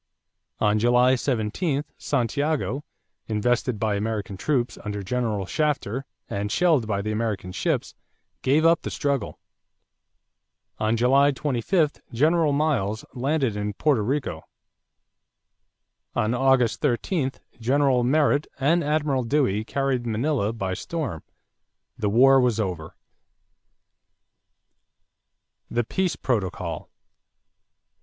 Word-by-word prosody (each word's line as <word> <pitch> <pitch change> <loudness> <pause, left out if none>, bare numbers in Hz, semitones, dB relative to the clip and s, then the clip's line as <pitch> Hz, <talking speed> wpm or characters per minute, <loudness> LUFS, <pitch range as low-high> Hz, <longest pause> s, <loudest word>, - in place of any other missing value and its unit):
On 105 0 +2
July 125 +3 +4
17, 135 - -1
Santiago, 140 -1 -1 0.4
invested 120 +2 0
by 110 -1 +1
American 105 -1 -2
troops 120 +1 -1
under 105 -2 -4
General 110 -2 -1
Shafter 135 - -1 0.2
and 100 +1 -3
shelled 160 -10 +3
by 100 -2 -1
the 110 - -2
American 105 -4 -2
ships, - - -1 0.5
gave 150 +5 +3
up 165 0 +5
the - - -4
struggle. 140 -7 -2 1.4
On 110 +1 +1
July 135 +4 +4
25 145 - 0
General 155 +5 +3
Miles 135 -8 0
landed 135 -3 0
in 105 0 -2
Porto 135 +2 +2
Rico. 135 +7 -2 1.7
On 110 +2 +1
August 130 -2 +2
13, 135 +1 0 0.3
General 130 +1 +2
Merritt 145 +2 +2
and 165 +6 +3
Admiral 145 -3 0
Dewey 115 -5 +1
carried 130 0 -1
Manila 115 -1 0
by 95 -5 -3
storm. 145 - -4 0.7
The 105 - -1
war 135 +5 +6
was 120 -3 +1
over. 90 -7 -3 2.7
=The 120 - 0
Peace 185 - -1
Protocol. 105 -8 -2
125 Hz, 105 wpm, -24 LUFS, 110-145 Hz, 2.7 s, war